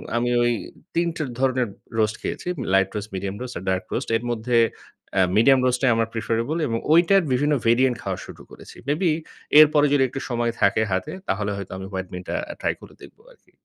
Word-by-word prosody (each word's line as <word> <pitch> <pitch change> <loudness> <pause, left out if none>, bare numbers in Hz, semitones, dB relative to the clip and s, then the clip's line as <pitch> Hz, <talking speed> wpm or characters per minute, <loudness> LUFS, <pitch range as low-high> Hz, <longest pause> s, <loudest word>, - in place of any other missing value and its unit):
আমি 120 +1 +1
ওই 120 - +3 0.4
৩ 170 +1 +2
টের 150 -4 -3
ধরনের 130 -2 +1 0.3
রোস্ট 110 0 +2
খেয়েছি। - - -5 0.3
লাইট 95 0 +4
রোস্ট, 105 0 -4
মিডিয়াম 95 +1 -3
রোস্ট 125 0 -5
আর 85 - -7
ডার্ক 95 0 0
রোস্ট। - - -2
এর 115 - -10
মধ্যে 120 +1 0 0.6
আ - - +6 0.2
মিডিয়াম 135 +4 +6
রোস্ট 125 0 +2
টাই 130 -3 +4
আমার 115 0 +1
প্রেফারেবল 115 +6 -1
এবং 115 - -1 0.2
ঐটার 175 +4 +5
বিভিন্ন 145 +4 +2
ভেরিয়েন্ট 125 +2 +4
খাওয়া - - -3
শুরু - - -12
করেছি, - - -13
মেবি 160 +4 +2 0.5
এরপরে 150 -1 +6
যদি 140 -2 +4
একটু 135 - -5
সময় 120 -1 0
থাকে 100 +2 +3
হাতে, 95 0 -1 0.2
তাহলে 105 +1 -1
হয়তো 100 -2 -7
আমি 95 - -6
হোয়াইট 95 -1 -4
বিনটা 90 0 -5 0.3
ট্রাই - - +1
করে - - -13
দেখব - - -14
আর - - -20
কি। - - -29
120 Hz, 200 wpm, -23 LUFS, 105-135 Hz, 0.6 s, আ